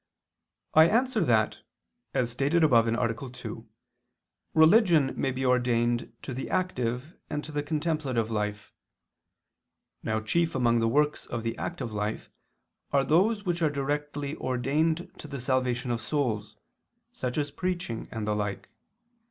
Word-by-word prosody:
I 160 +1 +8
answer 240 -2 +2
that 110 -3 +2 0.6
As 120 -2 +1
stated 140 +7 +2
above 115 -6 +5
(A. 115 0 +1 0.2
2), 125 - -8 0.9
religion 160 - +5
may 135 - 0
be 130 +1 -2
ordained 120 -2 +1
to 130 - -5
the 130 - -5
active 140 -5 -1
and 150 - -3
to 155 - -8
the 145 -1 -1
contemplative 145 -7 -1
life. 105 -1 -3 1.3
Now 110 0 -1
chief 165 +9 0
among 120 -2 +3
the 115 - +2
works 150 +5 +1
of 120 -1 -4
the 115 0 -2
active 130 -10 -4
life 105 +1 -3 0.6
are 140 -1 +3
those 205 - +2
which 175 -1 -1
are 160 - +4
directly 145 +1 -2
ordained 155 +8 0
to - - -8
the 140 -2 -6
salvation 125 0 0
of 120 -1 -1
souls, 110 -6 -2 0.6
such 125 +1 -3
as 145 -1 0
preaching 175 -9 -3
and 110 -2 -4
the 105 - +1
like. 105 -1 -3
135 Hz, 145 wpm, -28 LUFS, 115-155 Hz, 1.3 s, I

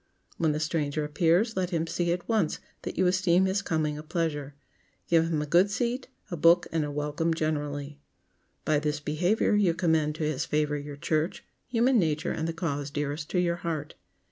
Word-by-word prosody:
When 160 -2 +2
the 150 - -1
stranger 155 -1 -1
appears, 170 +9 +2
let 185 -2 0
him 165 -3 0
see 170 +1 -1
at 175 0 -2
once 215 -9 +1 0.2
that - - -6
you 185 - +3
esteem 185 0 +3
his 190 +1 +1
coming 150 -2 -1
a - - -5
pleasure. 155 -3 -3 0.5
Give 165 -1 +4
him 155 -2 0
a - - -4
good 175 +6 +4
seat, 240 +5 -1 0.2
a - - -1
book 170 +2 +5
and 160 -1 +1
a 145 - -3
welcome 150 +3 -1
generally. 145 -2 -3 0.7
By 155 -1 +3
this 150 0 -1
behavior 175 +10 +1
you 200 -5 +3
commend 160 -3 +1
to 155 - -3
his 150 -3 0
favor 150 -1 0
your 145 0 -6
church, 155 +2 -1 0.2
human 245 +1 +3
nature 155 -3 0
and 160 - -2
the - - -1
cause 145 -4 -3
dearest 145 +1 -3
to 180 - +1
your 170 -1 +1
heart. 155 -4 -4
160 Hz, 195 wpm, -28 LUFS, 150-175 Hz, 0.7 s, book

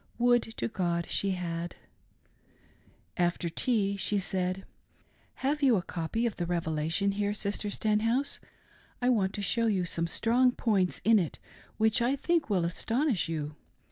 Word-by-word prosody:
Would, 240 0 +4 0.2
to - - -1
God, 175 -6 -1
she 195 -1 +1
had. 170 -1 -4 1.4
After 175 0 +1
tea, 200 +1 +1
she 205 +1 0
said 185 0 -1 0.2
— - - -37
" - - -36
Have 295 +2 +1
you 265 -4 +5
a 185 - 0
copy 180 +7 -2
of 230 - -2
the 175 - -2
Revelation 165 +2 0
here. 205 +1 -1
Sister 205 0 -2
Stenhouse 225 +6 0 0.3
.' - - -31
I 250 - +4
want 200 -6 +2
to 205 - -3
show 230 +3 +2
you 190 -5 +1
some 170 0 -1
strong 245 +7 +2
points 195 -8 +1
in 225 -1 +5
it 170 -5 -2 0.4
which 220 +1 +3
I 250 +4 +2
think 330 +2 0
will 185 -5 +2
astonish 225 - 0
you. 150 -2 -3
200 Hz, 165 wpm, -29 LUFS, 175-230 Hz, 1.4 s, you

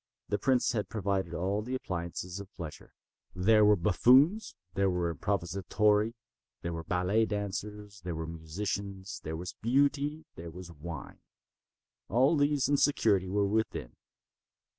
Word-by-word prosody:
The 105 - 0
prince 130 -2 +2
had 105 -4 -2
provided 95 -5 -1
all 95 +4 0
the 125 +4 -3
appliances 90 -3 -4
of 100 0 -9
pleasure. 80 -5 -9 0.4
There 105 +4 +5
were 105 0 +6
buffoons, 130 - +4 0.2
there 100 +1 +2
were 90 -2 0
improvisatori, 105 - +1 0.5
there 85 0 -2
were 80 0 -4
ballet 90 +6 +1
dancers, 105 0 -5
there 90 -2 -3
were 80 0 -3
musicians, 95 +4 -5
there 80 +1 -4
was 90 +1 -6
Beauty, 145 +5 +1
there 85 0 -7
was 85 +1 -9
wine. 80 -1 -8 0.9
All 130 - +4
these 145 -2 +2
and 145 -1 +2
security 100 -9 +3
were 100 +1 +2
within. 105 - -1
100 Hz, 140 wpm, -30 LUFS, 90-110 Hz, 0.9 s, were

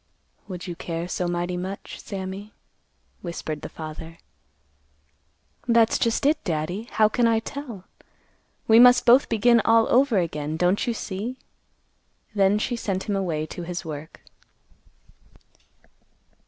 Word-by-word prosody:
"Would 180 -3 -7
you 175 -2 -5
care 165 0 -4
so 180 0 -2
mighty 175 +1 -2
much, 190 +2 -6
Sammy?" 195 +1 -7 0.7
whispered 160 -3 -5
the - - -7
father. 160 +1 -8 1.5
"That's 230 -1 +4
just 230 +3 0
it, 300 +2 +2
Daddy. 175 +6 -3
How 215 -1 +4
can 235 +2 +2
I 225 -1 +3
tell? 235 -4 -6 0.8
We 225 +1 +7
must 245 0 +7
both 250 +3 +6
begin 235 +1 +4
all 225 0 +4
over 255 -3 +4
again, 155 -3 -2
don't 180 +6 +1
you 235 - 0
see?" 215 +6 -5 1.0
Then 200 0 +3
she 240 +3 -1
sent 195 -5 -2
him 205 - -2
away 165 -6 -1
to 175 - -8
his 175 +1 -5
work. 155 0 -8
195 Hz, 130 wpm, -24 LUFS, 175-230 Hz, 1.5 s, We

